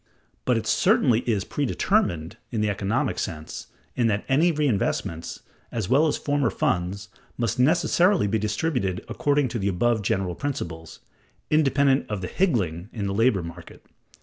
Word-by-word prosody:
But -, -, +2 dB
it -, -, -3 dB
certainly 115 Hz, -2 st, +3 dB
is 105 Hz, -4 st, +1 dB
"predetermined" 120 Hz, -, 0 dB
in 110 Hz, -3 st, -2 dB
the 105 Hz, -1 st, +1 dB
economic 100 Hz, -1 st, -1 dB
sense, 80 Hz, -1 st, -5 dB, 0.3 s
in 120 Hz, -2 st, +2 dB
that 105 Hz, -2 st, -1 dB
any 155 Hz, +6 st, +3 dB
reinvestments, 110 Hz, -, -1 dB, 0.3 s
as 110 Hz, -5 st, -3 dB
well 145 Hz, +5 st, +4 dB
as 150 Hz, -, 0 dB
former 145 Hz, -4 st, 0 dB
funds, 95 Hz, +2 st, -1 dB, 0.3 s
must 115 Hz, -1 st, -1 dB
necessarily 170 Hz, -, +3 dB
be 105 Hz, +2 st, 0 dB
distributed 105 Hz, -, -1 dB
according 145 Hz, -2 st, +1 dB
to 115 Hz, -, -3 dB
the 100 Hz, -, -1 dB
above 110 Hz, +4 st, +1 dB
general 95 Hz, -4 st, -1 dB
principles, 85 Hz, -, -5 dB, 0.5 s
independent 140 Hz, -2 st, +3 dB
of 105 Hz, -3 st, -3 dB
the 90 Hz, -, -3 dB
"higgling" 100 Hz, -, 0 dB
in 105 Hz, -4 st, -4 dB
the 100 Hz, -, -1 dB
labor 110 Hz, -3 st, +2 dB
market. 85 Hz, +1 st, -11 dB
110 Hz, 150 wpm, -25 LUFS, 95-140 Hz, 0.5 s, well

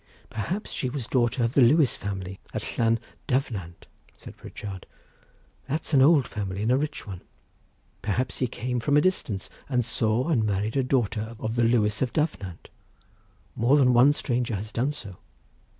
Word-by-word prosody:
"Perhaps 175 Hz, -, -3 dB
she 130 Hz, -, -2 dB
was 135 Hz, 0 st, -3 dB
the 115 Hz, -, -11 dB
daughter 120 Hz, 0 st, +2 dB
of 115 Hz, +1 st, 0 dB
the 140 Hz, -, +5 dB
Lewis 135 Hz, +3 st, +5 dB
family 95 Hz, -2 st, -5 dB, 0.2 s
of -, -, -2 dB
Llan 115 Hz, 0 st, +2 dB, 0.3 s
Dyfnant," 105 Hz, -10 st, -2 dB, 0.3 s
said -, -, -12 dB
Pritchard; 95 Hz, -3 st, -8 dB, 0.8 s
"that's 155 Hz, +2 st, -2 dB
an 135 Hz, -, +6 dB
old 145 Hz, -2 st, +5 dB
family 100 Hz, -1 st, -4 dB
and 115 Hz, -, +2 dB
a -, -, +5 dB
rich 150 Hz, -3 st, -2 dB
one. 95 Hz, -4 st, -7 dB, 0.8 s
Perhaps 120 Hz, +5 st, -1 dB
he 130 Hz, -, +1 dB
came 125 Hz, +1 st, -3 dB
from 145 Hz, +5 st, +2 dB
a -, -, +6 dB
distance 115 Hz, -, 0 dB, 0.2 s
and 125 Hz, -3 st, +1 dB
saw 115 Hz, +4 st, 0 dB
and 125 Hz, -9 st, +2 dB
married 105 Hz, +1 st, -1 dB
a 135 Hz, -, +3 dB
daughter 115 Hz, -3 st, -1 dB
of 110 Hz, +1 st, -3 dB
the 120 Hz, -, +2 dB
Lewis 110 Hz, -3 st, +2 dB
of 130 Hz, -3 st, 0 dB
Dyfnant—more 120 Hz, -, -3 dB
than 125 Hz, -3 st, +5 dB
one 125 Hz, +4 st, +7 dB
stranger 120 Hz, -5 st, -1 dB
has 105 Hz, +2 st, -5 dB
done 130 Hz, +5 st, 0 dB
so. 100 Hz, -11 st, -9 dB
120 Hz, 170 wpm, -26 LUFS, 105-135 Hz, 0.8 s, one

